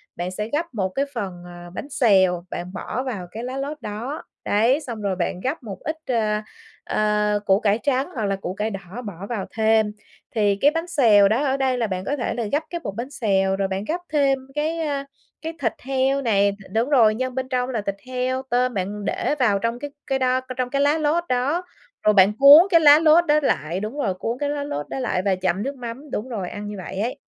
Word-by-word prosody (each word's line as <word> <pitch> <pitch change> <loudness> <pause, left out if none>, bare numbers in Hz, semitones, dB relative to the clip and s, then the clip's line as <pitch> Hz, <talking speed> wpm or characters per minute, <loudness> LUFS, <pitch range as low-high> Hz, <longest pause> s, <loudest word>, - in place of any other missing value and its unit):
bạn 175 +1 -3
sẽ 210 +4 -4
gắp 325 0 -2
một 190 -4 -1
cái 275 +8 -1
phần, 190 -6 -5
ờ, 175 0 -10
bánh 285 - -6
xèo 190 -9 +3
bạn 180 +2 -6
bỏ 240 +7 -4
vào 205 -9 -5
cái 225 +2 -6
lá 255 +2 -4
lốt 290 +2 -4
đó. 230 +9 -5 0.2
Đấy, 230 +7 +3
xong 235 -6 -6
rồi 195 -2 -1
bạn 180 0 -2
gắp 260 - -3
một 200 -4 -7
ít, 315 +1 -3
ờ, 215 -4 +1 0.4
ờ, 210 0 +1
củ 195 +1 +4
cải 210 0 +2
trắng 275 +1 +1
hoặc 220 -4 -1
là 195 -1 0
củ 185 -1 -5
cải 210 +2 -2
đỏ 195 +3 -7
bỏ 195 -1 -7
vào 220 -6 -3
thêm. 220 -1 +2 0.4
Thì 205 -2 +3
cái 290 - +6
bánh 330 +2 -3
xèo 220 - +5
đó 245 +8 +1
ở 270 0 +1
đây 260 -2 +1
là 230 -2 0
bạn 185 0 -4
có 285 - -1
thể 245 - -2
là 240 - -2
gắp 295 +3 +1
cái 345 - -4
bột 200 -3 -5
bánh 240 +4 -4
xèo, 195 -6 +1
rồi 195 0 0
bạn 190 +1 -3
gắp 350 +3 -2
thêm 275 -2 +3 0.2
cái, 315 +3 -1
a, 285 -3 -2 0.4
cái 325 +1 -4
thịt 225 -5 0
heo 270 +1 +1
này, 200 -5 +3
đ 200 - -9 0.2
đúng 230 +5 +1
rồi, 225 -6 +5
nhân 255 +1 -3
bên 260 0 -3
trong 250 -1 0
là 230 -4 -2
thịt 200 -1 -3
heo, 255 +1 -1
tôm. 250 +1 +1
Bạn 200 +1 -3
để 360 -4 -1
vào 210 -6 +3
trong 230 +3 -2
cái 290 +1 -6 0.2
cái 270 -1 0
đó 255 0 +2 0.2
trong 255 -1 -1
cái 280 +1 0
lá 290 +2 +3
lốt 315 +3 +1
đó, 270 +8 +1 0.4
rồi 215 - +5
bạn 195 0 +6
cuốn 290 +7 +10
cái 335 - +6
lá 295 -1 +8
lốt 325 +2 +5
đó 300 0 +4
lại, 170 - 0
đúng 215 +8 -5
rồi, 195 -10 0
cuốn 230 +6 -3
cái 290 - -1
lá 290 0 -2
lốt 145 - -4
đó - - -4
lại 245 -7 0
và 195 - +3
chấm 185 +2 -1
nước 275 +1 -3
mắm. 250 +4 -8
Đúng 225 +5 -3
rồi, 200 -7 -4
ăn 205 0 -6
như 210 - -6
vậy 190 +1 -6
ấy. 235 +4 -2
235 Hz, 245 wpm, -23 LUFS, 200-275 Hz, 0.4 s, cuốn